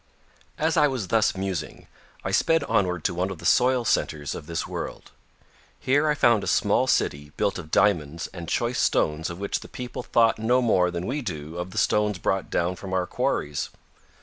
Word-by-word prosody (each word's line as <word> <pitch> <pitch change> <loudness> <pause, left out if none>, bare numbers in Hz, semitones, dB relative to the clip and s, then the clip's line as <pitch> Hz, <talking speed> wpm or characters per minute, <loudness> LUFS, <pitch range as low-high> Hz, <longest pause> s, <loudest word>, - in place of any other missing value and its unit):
As 160 +2 +1
I 150 -1 +6
was 125 -9 -3
thus 110 -2 +2
musing 95 -5 -4 0.4
I - - -2
sped 165 -2 +3
onward 90 - 0
to - - 0
one 90 +2 -1
of 95 - -6
the 85 - -11
soil 125 +6 +3
centers 75 -8 0
of 75 - -8
this 85 -1 -2
world. - - -6 0.7
Here 145 +4 +2
I 150 - +2
found 115 -7 +3
a - - -4
small - - +2
city 75 +1 0
built 100 - 0
of 80 -3 -9
diamonds 80 -5 +1
and 85 -2 -7
choice 120 +1 0
stones 75 +1 +1
of 85 - -6
which 100 +1 -2
the - - -11
people 125 0 -6
thought 115 -2 +2
no 120 +3 +3
more 95 -7 +3
than 90 0 -4
we 140 +7 -2
do 80 - -6
of 90 +1 -4
the - - -10
stones 105 -2 +2
brought 95 +1 -1
down 90 +2 0
from 95 0 -7
our 90 -1 +1
quarries. 75 -4 -2
95 Hz, 200 wpm, -25 LUFS, 85-120 Hz, 0.7 s, I